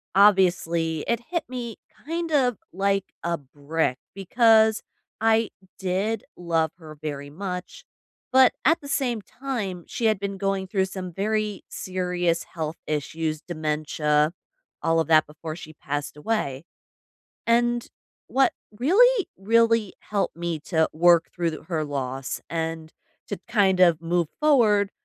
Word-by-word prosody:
obviously, 175 -5 +3
it 235 -1 +1
hit 340 -2 -1
me, 240 -3 -5 0.3
kind 330 +1 -3
of, 250 -6 +3 0.2
like, 195 0 +1 0.2
a 170 0 0
brick 145 0 -2 0.2
because 220 +2 +4 0.4
I 225 0 +3 0.3
did 195 +4 -1
love 165 -2 0
her 155 -3 -12
very 145 -2 -5
much, 180 +3 -6 0.5
but 260 -1 +7
at 325 - +5
the 285 - -9
same 245 -6 0
time, 205 -8 -4
she 230 - -3
had 215 -3 +3
been 200 -1 -3
going 195 -1 -1
through 190 -1 +1
some 185 -1 -6
very 210 +1 -1
serious 180 -2 -1
health 160 -1 -3
issues, 155 +1 -2
dementia, 150 -1 0 0.5
all 165 0 +2
of 160 - 0
that 155 -1 +5
before 155 +1 -7
she 155 -2 -10
passed 145 0 -4
away, 150 -6 -2 0.8
and 240 0 +2 0.4
what 270 +1 +3 0.3
really, 420 - +5
really 230 0 +3
helped 200 -5 -2
me 170 -2 -2
to 160 -1 +1
work 170 +1 +4
through 165 -3 -2
her 160 -3 -1
loss 135 -2 -3
and 160 -1 -3 0.4
to, - - -3
kind 195 -4 +3
of, 170 -3 +5
move 170 -1 0
forward 215 -9 +4
185 Hz, 135 wpm, -25 LUFS, 160-220 Hz, 0.8 s, but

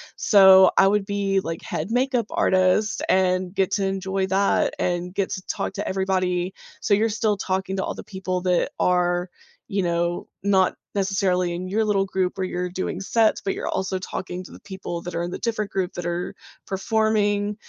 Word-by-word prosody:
so 190 -2 +7
I 195 - +7
would 205 0 +2
be, 200 -1 0
like, 165 -2 -5
head 215 - -4
makeup 250 -1 +1
artist 185 +3 +2
and 185 -1 +2
get 190 -2 +1
to 200 -2 +1
enjoy 190 0 -1
that 195 +1 +2
and 180 0 -1
get 195 -1 -1
to 185 - -4
talk - - -3
to 205 - -4
everybody, 185 -1 0 0.3
so 205 - +1
you're 220 +2 +2
still 215 -1 0
talking 190 0 -2
to 190 - -1
all - - -3
the - - -8
people 185 -2 -4
that 180 -1 +1
are, 175 0 +1 0.4
you 195 -1 -1
know, 170 0 -1 0.2
not 190 -2 +3 0.2
necessarily 190 -3 +1
in 180 +2 -4
your 215 +4 0
little 195 -2 +2
group 185 -1 -1
where 190 - -1
you're 180 0 -3
doing 185 +1 -3
sets, 220 +3 +2
but 195 - -1
you're - - -5
also 190 0 -2
talking 185 0 -5
to - - -13
the - - -12
people 190 -3 -6
that 175 0 -7
are 170 - -1
in 175 - -3
the - - -4
different 215 -3 -2
groups 190 -1 -2
that 175 - -5
are 175 +1 -3 0.3
performing. 205 0 0
190 Hz, 195 wpm, -23 LUFS, 180-200 Hz, 0.4 s, so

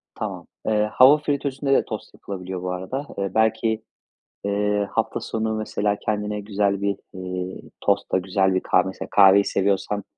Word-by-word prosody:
Tamam. - - -5 0.2
Eee, 105 -1 +2
hava 135 +6 +7
fritözünde 140 -2 -1
de - - +4
tost - - -7
yapılabiliyor, 95 -2 -6
bu 90 0 -2
arada. 95 +11 -4
Eee, 100 -1 -2
belki, 110 0 +1 0.6
eee, 100 0 0
hafta - - -1
sonu, 110 0 -2
mesela, 105 -1 -1
kendine 105 0 -2
güzel 100 -1 0
bir, 100 -1 0 0.2
eee, 90 0 -5 0.2
tostla, - - +1
güzel 95 +1 +1
bir 95 - +2
kahve - - +2
mesela, 95 - -6
kahveyi 100 0 +7
seviyorsan 100 +1 0
100 Hz, 155 wpm, -23 LUFS, 95-110 Hz, 0.6 s, hava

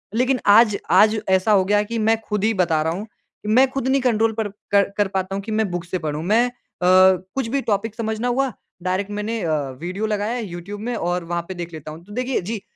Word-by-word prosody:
लेकिन 255 +2 +2
आज, 210 0 +6
आज 215 +1 +5
ऐसा 190 +3 +3
हो 195 -2 +5
गया 205 +1 +3
कि 230 +2 -4
मैं 225 - +4
ख़ुद 210 -2 -1
ही 225 +1 +3
बता 170 -5 +1
रहा 160 +1 0
हूँ, 200 +5 -6 0.4
मैं 250 +5 +5
ख़ुद 270 -1 -2
नहीं 270 +1 +2
कंट्रोल 225 -3 +2
कर 220 - 0 0.2
कर 200 -1 +4
कर 205 -1 +2
पाता 190 0 -1
हूँ 200 - -3
कि 220 - -6
मैं 215 -1 +1
बुक 175 -1 -4
से 180 +2 -3
पढ़ूँ। 155 -1 -3
मैं 220 +7 +3
अ, - - -7 0.8
कुछ 270 -3 -1
भी 275 +4 -1
टॉपिक 215 -1 -1
समझना 220 +1 -2
हुआ, 260 +2 +1 0.3
डायरेक्ट 185 +2 -1
मैंने 210 +2 -3
अ, 160 -2 0 0.3
वीडियो 185 +5 -3
लगाया 210 0 -1
है 245 -2 -3
यूट्यूब 180 +3 -7
में 240 +2 -3
और 175 -3 -1
वहाँ 170 +1 -2
पे 190 - -5
देख 175 -1 -7
लेता 155 -1 -8
हूँ। 160 +2 -11
तो 205 - -15
देखिए, 250 +2 -1
जी, 210 +3 -4
210 Hz, 240 wpm, -21 LUFS, 185-230 Hz, 0.8 s, आज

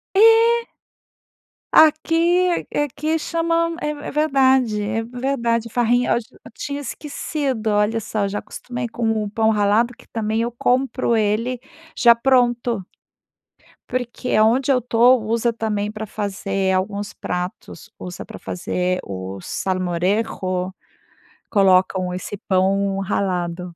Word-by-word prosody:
É. 455 +2 +5 1.0
Aqui 315 +1 +5 0.4
é - - +2
aqui - - -3
aqui 300 +3 -1
chama, 335 +1 0
é 300 - -1
é 295 -1 -7
verdade, 265 -7 +2
é 225 +2 -2
verdade, 235 -2 -1
farrinha, 245 +1 +1
eu - - +4
ach 235 - -2
eu - - -17
tinha 285 +2 -5
esquecido, 270 -2 -3
olha 210 +2 +1
só. 210 -1 -2
Eu - - -2
já 205 +1 -3
acostumei 245 -1 -6
com 225 -2 -1
o 205 - -4
pão 220 +1 +2
ralado, 215 +3 +2
que - - -19
também 220 0 -1
eu 235 +1 -1
compro 250 0 +1
ele 230 +4 0 0.3
já 235 0 +7
pronto. 240 -4 +1 1.0
Porque 250 0 -3
aonde 235 +6 +3
eu 255 - +3
tô, 245 +2 +4
usa 230 +2 0
também 210 -2 -2
para 215 0 -6
fazer 195 -2 -2
alguns 200 +2 -2
pratos. 180 +4 -6
Usa 180 -1 -7
para - - -10
fazer 180 +1 -2
o 95 0 -6
salmorejo. 185 - -1 0.8
Colocam 185 -2 +3
esse 185 +3 -5
pão 195 +1 +1
ralado. 180 -3 -2
225 Hz, 130 wpm, -21 LUFS, 195-255 Hz, 1.0 s, já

